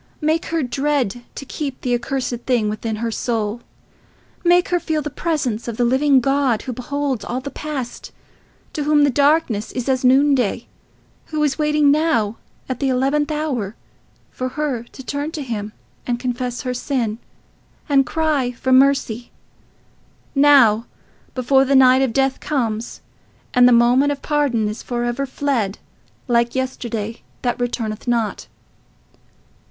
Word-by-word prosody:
Make 315 +1 0
her 330 -2 -1
dread 265 -3 -1
to 275 - -7
keep 275 -1 -5
the 250 - -1
accursed 245 +1 -2
thing 235 -5 +2
within 215 +1 -3
her 230 +1 -3
soul. 225 -1 -2 0.8
Make 355 0 +4
her 350 - +2
feel 315 -3 -2
the 295 - -4
presence 270 -9 -2
of 230 -2 -4
the 245 - +2
living 265 +2 +4
God, 270 -3 +1
who 255 - -4
beholds 270 +1 -3
all 245 - -3
the 280 +2 -7
past, 280 -5 -6 0.6
to 300 -3 -3
whom 300 -1 +4
the 285 - +4
darkness 280 -6 +2
is 250 0 -4
as 260 -1 +1
noonday; 260 -3 +3 0.6
who 310 -1 -1
is 290 0 0
waiting 300 -1 +3
now, 285 -9 +1 0.3
at 260 -2 -4
the 275 - +1
eleventh 275 +4 +1
hour, 265 -9 -2 0.6
for 255 0 -3
her 280 -3 -2
to 265 - -11
turn 285 +2 -3
to 300 - -4
him, 215 -4 -4 0.4
and 240 -1 -1
confess 245 0 -3
her 250 -1 -3
sin, 240 -4 -2 0.7
and 280 -3 +4
cry 290 -2 0
for 260 +2 -2
mercy—now, 260 -1 +1 0.5
before 265 +1 +3
the 275 +1 +2
night 260 0 +6
of 265 -3 +1
death 270 +2 +1
comes, 235 -6 -2 0.5
and 250 -1 +6
the - - +5
moment 245 +4 +4
of 285 - -5
pardon 280 -8 +1
is 210 +2 -5
for 240 -1 -3
ever 240 +3 -2
fled, 255 -7 -1 0.5
like 235 0 +2
yesterday 235 -4 -3 0.2
that 245 0 -1
returneth 230 -2 -3
not. 230 -3 -1
260 Hz, 150 wpm, -20 LUFS, 235-285 Hz, 0.8 s, night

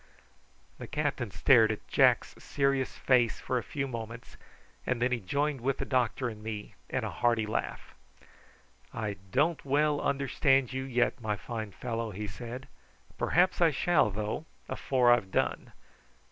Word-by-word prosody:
The - - -7
captain 145 -6 -2
stared 110 +4 +5
at 105 - -6
Jack's - - +3
serious 140 -1 0
face 120 -3 +2
for 125 - -1
a - - -7
few 140 -2 -3
moments, 115 -1 -7 0.5
and 125 -2 -1
then 125 +1 +1
he 125 - +1
joined 140 +6 -1
with 135 +2 0
the - - -3
doctor 125 -1 0
and 110 -3 -7
me 105 -1 -6 0.2
in - - -1
a - - -3
hearty 115 -2 +1
laugh. 105 - -4 1.0
"I 105 -3 -4
don't 150 - +1
well 145 +2 +2
understand 135 -1 +2
you 130 0 -3
yet, 125 -1 0
my 105 -2 -1
fine 110 -1 -6
fellow," 115 +1 -4
he 105 +1 -5
said; 120 +5 -7 0.5
"perhaps 180 +2 +2
I 170 - +6
shall, 160 -3 +2
though, 105 +9 -3 0.2
afore 125 -3 +2
I've 120 -6 +3
done. - - -1
125 Hz, 155 wpm, -30 LUFS, 110-135 Hz, 1.0 s, I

